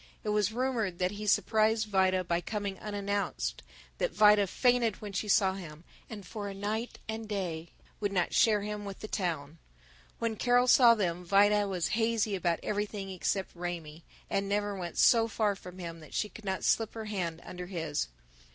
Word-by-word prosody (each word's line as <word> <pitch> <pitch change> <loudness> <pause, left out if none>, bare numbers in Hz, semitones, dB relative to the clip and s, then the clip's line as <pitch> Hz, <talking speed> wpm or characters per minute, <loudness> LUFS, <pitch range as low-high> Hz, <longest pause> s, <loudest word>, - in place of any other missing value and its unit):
It 215 - -2
was 210 -1 +2
rumored 230 -6 -1
that 180 0 0
he 210 +1 -6
surprised 220 +2 +3
Vida 190 -2 +2
by 175 0 0
coming 205 -1 -4
unannounced, 200 - -2 0.4
that - - +1
Vida 210 -1 +5
fainted 240 0 +2
when 205 -2 -7
she 205 +3 -2
saw 195 -1 +4
him, 165 -4 -9 0.3
and 205 -4 -8
for 205 +2 -6
a 195 - -7
night 215 +4 -3
and 220 0 -5
day 170 -5 -3 0.3
would 205 -1 -1
not 180 -3 0
share 215 -4 +4
him 210 0 -4
with 200 -1 -7
the 215 - -5
town. 165 -7 -3 0.6
When 230 -2 -2
Carol 245 +2 +3
saw 240 -2 +7
them 180 -4 -1
Vida 205 +3 +4
was 180 -3 -1
hazy 225 -2 +1
about 170 -2 0
everything 205 -1 -3
except 190 +1 -2
Raymie, 170 -2 -6 0.2
and 195 0 -1
never 205 0 0
went 175 -3 -6
so 230 -1 +5
far 215 -2 0
from 180 -1 -11
him 170 -2 -7
that 155 - -12
she 210 - 0
could 220 - -13
not 190 -1 -2
slip 225 -1 +1
her 220 -1 -5
hand 180 -6 -3
under 180 0 -7
his. 160 - -2
200 Hz, 185 wpm, -30 LUFS, 180-215 Hz, 0.6 s, saw